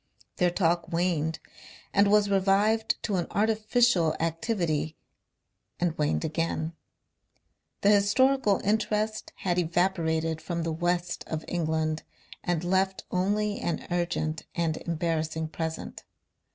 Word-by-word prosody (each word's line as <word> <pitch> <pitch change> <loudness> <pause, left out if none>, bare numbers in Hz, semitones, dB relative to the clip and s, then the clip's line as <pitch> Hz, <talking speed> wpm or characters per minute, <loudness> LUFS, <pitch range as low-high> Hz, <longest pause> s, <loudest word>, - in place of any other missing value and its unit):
Their 180 - +3
talk 170 -1 0
waned, 165 -2 0 0.6
and 200 0 +5
was 210 0 +5
revived 200 +3 +2
to 200 -3 0
an 175 - -1
artificial 215 -5 +2
activity 165 -2 -1 0.8
and 175 -2 0
waned 150 +1 0
again. 160 0 -2 1.1
The 200 - +5
historical 210 +2 +3
interest 215 +1 0
had 180 -1 0
evaporated 165 -2 0
from 170 +1 -3
the 165 -1 -1
west 175 +1 -1
of 160 -1 -4
England 160 -2 -1 0.4
and 175 -2 0
left 190 +1 +1
only 205 +3 0
an 170 -3 -2
urgent 170 -2 -1
and 165 -2 0
embarrassing 160 -1 -2
present. 160 0 -5
175 Hz, 110 wpm, -28 LUFS, 160-200 Hz, 1.1 s, and